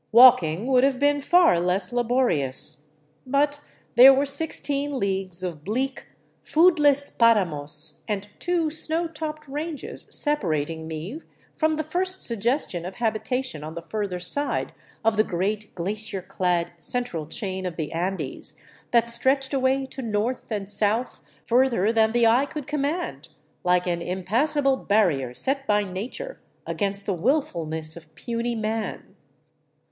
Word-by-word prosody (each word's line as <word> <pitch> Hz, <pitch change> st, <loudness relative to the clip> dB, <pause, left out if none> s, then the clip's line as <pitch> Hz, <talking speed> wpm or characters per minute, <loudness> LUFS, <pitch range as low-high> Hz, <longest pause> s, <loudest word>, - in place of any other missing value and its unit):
Walking 225 Hz, -7 st, +6 dB
would 255 Hz, -1 st, +3 dB
have 270 Hz, -1 st, +3 dB
been 285 Hz, +1 st, +2 dB
far 345 Hz, -, +4 dB
less 180 Hz, +3 st, 0 dB
la 245 Hz, -, +2 dB
borious. 155 Hz, -, +1 dB, 0.4 s
But 285 Hz, +2 st, +1 dB, 0.3 s
there 250 Hz, +3 st, +10 dB
were 270 Hz, +1 st, +2 dB
sixteen 285 Hz, -1 st, -1 dB
leagues 190 Hz, -3 st, -1 dB
of 165 Hz, -5 st, -5 dB
bleak, 260 Hz, -, -3 dB, 0.4 s
foodless 295 Hz, -4 st, +4 dB
paramos 165 Hz, -10 st, +1 dB
and 205 Hz, -1 st, -3 dB
two 340 Hz, -3 st, 0 dB
snow 325 Hz, +2 st, 0 dB
topped 305 Hz, -1 st, -6 dB
ranges 300 Hz, +2 st, -6 dB
separating 160 Hz, -, 0 dB
me 165 Hz, -, -6 dB, 0.3 s
from 315 Hz, 0 st, +1 dB
the 310 Hz, -, -2 dB
first 370 Hz, +4 st, -2 dB
suggestion 230 Hz, -, 0 dB
of 185 Hz, +2 st, -7 dB
habitation 230 Hz, -, -2 dB
on 155 Hz, +1 st, -7 dB
the 170 Hz, -, -6 dB
further 205 Hz, -2 st, -3 dB
side 285 Hz, +11 st, -2 dB, 0.3 s
of 225 Hz, -1 st, +3 dB
the 215 Hz, -, +5 dB
great 205 Hz, +3 st, -3 dB
glacier 195 Hz, +1 st, -3 dB
clad 180 Hz, -2 st, -1 dB
central 175 Hz, -9 st, +1 dB
chain 190 Hz, +1 st, -4 dB
of 175 Hz, -, -6 dB
the 155 Hz, -3 st, -4 dB
Andes, 180 Hz, +4 st, -3 dB, 0.3 s
that 235 Hz, -1 st, +3 dB
stretched 265 Hz, +4 st, +1 dB
away 265 Hz, 0 st, +1 dB
to 265 Hz, -, -8 dB
north 225 Hz, +2 st, -2 dB
and 205 Hz, -2 st, -3 dB
south 210 Hz, +4 st, +1 dB, 0.2 s
further 235 Hz, -4 st, +2 dB
than 220 Hz, -1 st, +3 dB
the 240 Hz, 0 st, +3 dB
eye 245 Hz, +5 st, +4 dB
could 300 Hz, -1 st, -6 dB
command, 295 Hz, -, -3 dB, 0.4 s
like 180 Hz, 0 st, +2 dB
an 170 Hz, -1 st, -1 dB
impassable 255 Hz, -, +1 dB
barrier 155 Hz, -, +1 dB
set 275 Hz, -, -1 dB
by 210 Hz, 0 st, +3 dB
nature 230 Hz, -, -6 dB, 0.3 s
against 200 Hz, -1 st, -3 dB
the 200 Hz, -, 0 dB
wilfulness 165 Hz, -, -1 dB
of 160 Hz, -2 st, -14 dB
puny 235 Hz, +2 st, -3 dB
man. 220 Hz, 0 st, -4 dB
225 Hz, 140 wpm, -24 LUFS, 180-275 Hz, 0.4 s, there